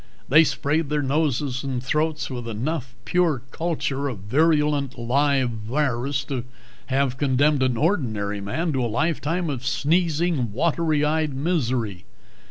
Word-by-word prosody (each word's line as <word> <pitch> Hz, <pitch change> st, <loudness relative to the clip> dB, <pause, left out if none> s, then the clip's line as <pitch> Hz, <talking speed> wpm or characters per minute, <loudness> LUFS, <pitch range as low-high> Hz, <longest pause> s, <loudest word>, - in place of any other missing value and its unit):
They 155 Hz, +5 st, +7 dB
sprayed 150 Hz, 0 st, 0 dB
their 150 Hz, -1 st, 0 dB
noses 140 Hz, -2 st, 0 dB
and 130 Hz, -3 st, -3 dB
throats 155 Hz, +3 st, 0 dB
with 120 Hz, -2 st, -5 dB
enough 125 Hz, +3 st, -3 dB
pure 170 Hz, -8 st, +1 dB
culture 145 Hz, -4 st, -2 dB
of 125 Hz, -6 st, -4 dB
virulent 145 Hz, -, +1 dB
live 130 Hz, +1 st, +2 dB
virus 130 Hz, +3 st, -1 dB
to 130 Hz, -4 st, -3 dB, 0.4 s
have 135 Hz, -1 st, 0 dB
condemned 145 Hz, +1 st, +3 dB
an 130 Hz, -2 st, +1 dB
ordinary 110 Hz, -, 0 dB
man 155 Hz, -, -2 dB
to 130 Hz, -2 st, 0 dB
a -, -, +1 dB
lifetime 160 Hz, +6 st, 0 dB
of 135 Hz, -4 st, -3 dB
sneezing, 160 Hz, -, +1 dB
watery 155 Hz, +2 st, +1 dB
eyed 155 Hz, -2 st, 0 dB
misery. 125 Hz, -, -1 dB
140 Hz, 135 wpm, -24 LUFS, 125-155 Hz, 0.4 s, They